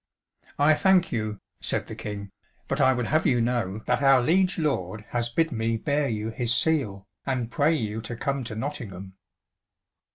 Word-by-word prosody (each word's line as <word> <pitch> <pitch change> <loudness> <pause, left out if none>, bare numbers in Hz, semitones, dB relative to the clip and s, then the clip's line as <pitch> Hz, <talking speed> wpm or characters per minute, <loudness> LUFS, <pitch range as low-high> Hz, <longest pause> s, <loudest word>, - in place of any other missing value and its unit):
"I 145 +2 +5
thank 185 +2 +3
you," 110 -3 -2 0.2
said - - -1
the - - -8
King, 100 -1 -6 0.4
"but 135 +2 0
I 130 -1 +6
would 125 -2 -1
have 155 +5 +2
you 125 -2 +3
know 115 -4 -1
that 125 +2 +1
our 135 -1 +6
liege 180 +8 +2
lord 110 - -2
has 120 -1 -1
bid 160 +6 +1
me 115 -1 0
bear 145 +3 0
you 110 0 -2
his 120 0 -1
seal, 125 -8 +1 0.2
and 125 -4 -2
pray 150 +5 +3
you 110 -4 -3
to 120 +1 -6
come 140 +3 -2
to 110 - -5
Nottingham." 105 -7 -6
120 Hz, 175 wpm, -26 LUFS, 110-145 Hz, 0.4 s, I